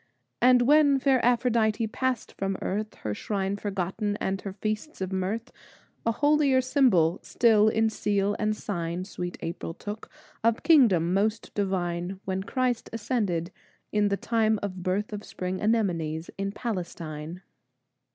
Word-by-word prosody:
And 250 0 +6
when 285 +1 +5
fair 265 -2 +2
Aphrodite 235 -2 +2
passed 255 +2 -2
from 195 0 -3
earth, 210 +3 -3
Her 105 - -4
shrines 195 - -2
forgotten 205 +1 -2
and 190 0 -2
her 195 - -6
feasts 215 +8 -4
of 190 0 -3
mirth, 210 +6 -2 0.6
A - - +4
holier 290 +1 +3
symbol 245 - +3
still 220 -3 +4
in 220 +1 +2
seal 205 -1 0
and 215 0 0
sign, 175 -2 -3
Sweet 180 -2 -5
April 165 0 -5
took, 210 +1 -7 0.3
of 230 0 +2
kingdom 200 - +5
most 215 +3 0
divine, 185 -2 -2
When 190 0 -1
Christ 250 +3 -1
ascended, 210 -7 -1 0.4
in 210 -1 +2
the 200 0 0
time 220 -1 +1
of 185 -2 -4
birth 195 +4 -1
Of 210 0 -5
spring 185 0 -4
anemones, 170 -8 0
in 195 0 -2
Palestine. 175 -6 -5
205 Hz, 140 wpm, -27 LUFS, 185-230 Hz, 0.6 s, And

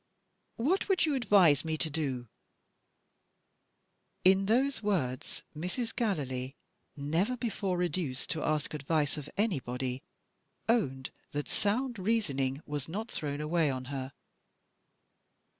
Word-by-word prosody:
"What 335 - +1
would 380 -3 +4
you 305 - +1
advise 195 - +5
me 160 -1 -1
to 160 - +1
do?" 135 -6 -2 2.0
In 190 +1 +6
those 260 +4 +3
words 160 - -1
Mrs. 185 +9 -3
Gallilee 135 - -1 0.4
never 165 - +1
before 200 -6 -1
reduced 175 -7 -1
to 160 -1 -1
ask 155 -1 0
advice 150 0 +1
of 150 -1 -6
anybody 130 - -1 0.7
owned 135 - +1 0.2
that 145 0 -2
sound 235 +3 0
reasoning 150 -10 0
was 145 -1 -4
not 215 +7 -4
thrown 145 -1 -3
away 155 0 +2
on 130 -1 -3
her. 135 0 -4
160 Hz, 115 wpm, -31 LUFS, 140-210 Hz, 2.0 s, In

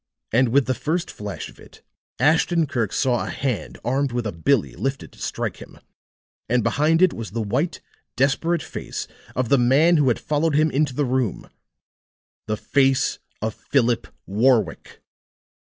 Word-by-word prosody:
And 125 +1 +4
with 135 +2 +3
the 130 - +1
first 155 +8 -2
flash 105 -2 -6
of - - -16
it, - - -17 0.4
Ashton 160 +4 +3
Kirk 120 -8 -1
saw 125 -3 +1
a - - -5
hand 125 -6 -3
armed 135 +2 +1
with 120 -1 -2
a 105 - -1
"billy" 90 - +1
lifted 135 0 -4
to - - -17
strike - - -3
him; - - -13 0.7
and 120 -1 +2
behind 155 - +3
it 185 - +4
was 115 -2 -6
the 115 +2 -3
white, 130 - -1 0.3
desperate 150 +6 +1
face - - -6 0.3
of 125 -2 -1
the 140 - +5
man 145 +8 +4
who 145 -3 +3
had 120 - +3
followed 150 0 0
him 155 +1 +3
into 140 -2 0
the 145 - +1
room 125 -4 -2 1.0
the 110 0 -1
face 135 +1 +2 0.2
of 110 -1 -1
Philip 120 -3 0 0.2
Warwick. 110 - +1
130 Hz, 165 wpm, -23 LUFS, 120-145 Hz, 1.0 s, the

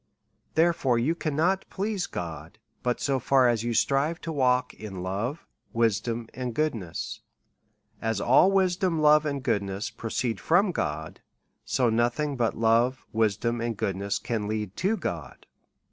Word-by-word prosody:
Therefore, 160 -7 +3
you 130 +8 +2
cannot 170 +4 0
please 200 -1 -2
God, 80 +2 -6 0.2
but 125 -1 -1
so 135 -1 0
far 130 0 +4
as 115 -2 +1
you 120 -1 -1
strive 140 +8 +2
to 165 - -4
walk 130 -4 +2
in 95 -4 -7
love, 105 - -3 0.3
wisdom, 115 +1 0
and 125 -2 -4
goodness. 115 - -2 0.8
As 110 -2 -1
all 135 - +5
wisdom, 185 -3 +2
love, 150 0 +5
and 140 -2 -3
goodness 100 -1 -1
proceed 115 -1 -2
from 180 - +3
God, 75 - -4 0.4
so 115 +2 +2
nothing 120 +6 +1
but 120 -3 0
love, 115 +3 +2
wisdom, 115 +2 +1
and 115 -2 -2
goodness, 100 +1 -1
can 110 -4 -3
lead 105 -2 -3
to 210 +4 +1
God. - - -5
120 Hz, 145 wpm, -27 LUFS, 110-150 Hz, 0.8 s, all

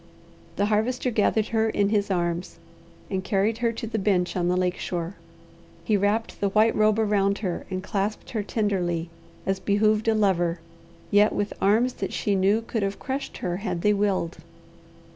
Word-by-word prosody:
The 200 - +1
Harvester 235 +4 0
gathered 215 0 +1
her 225 -1 +1
in 205 -2 +1
his 205 -1 +1
arms 175 -1 -2 0.5
and 190 -1 -1
carried 210 +3 0
her 235 -1 +1
to 225 - -5
the 220 0 -2
bench 190 -3 +1
on 175 -1 0
the 180 +1 +2
lake 180 0 0
shore. 175 0 -3 0.7
He 210 +5 +1
wrapped 205 +3 0
the 200 - +2
white 215 +3 +3
robe 215 0 +3
around 205 -2 +2
her 175 -2 -3
and 185 -1 -3
clasped 205 +3 -3
her 225 -4 -1
tenderly 180 -6 -1 0.3
as 190 0 0
behooved 215 +2 +2
a 225 - +4
lover, 175 -5 +1 0.5
yet 205 +1 +5
with 205 0 -2
arms 225 +6 +3
that - - -2
she 205 - 0
knew 200 +4 +2
could 225 -1 -3
have 195 0 -1
crushed 270 +1 -4
her 175 -1 -1
had 185 -4 -3
they 210 - +4
willed. 200 -4 0
205 Hz, 180 wpm, -25 LUFS, 185-220 Hz, 0.7 s, yet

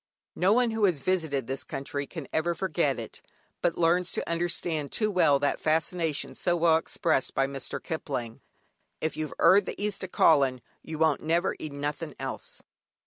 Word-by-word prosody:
No 185 +2 +3
one 240 +1 +3
who 220 -2 +2
has 175 -7 +2
visited 160 -6 0
this 135 +2 -4
country 140 +1 -4
can 160 -6 -7
ever 170 +2 +1
forget 165 -6 0
it, 115 -2 -7 0.4
but 170 - +1
learns 175 +1 +2
to - - -3
understand 170 -3 -1
too 215 -1 0
well 165 -7 +4
that 140 +1 0
fascination 160 0 0
so 175 - 0
well 165 -1 +4
expressed 160 -3 -1
by 135 - +3
Mr. 135 -1 -4
Kipling: 125 -8 -5 0.6
"If 160 - -2
you've 155 -1 -4
'eard 190 +3 +6
the - - -5
East 205 -1 -1
a' 185 - -4
callin', 135 -8 +3 0.2
you 160 - -7
won't 160 -2 +2
never 170 +4 +1
'eed 155 -2 -6
nought 145 +2 -3 0.2
else." - - -6
160 Hz, 175 wpm, -28 LUFS, 140-175 Hz, 0.6 s, eard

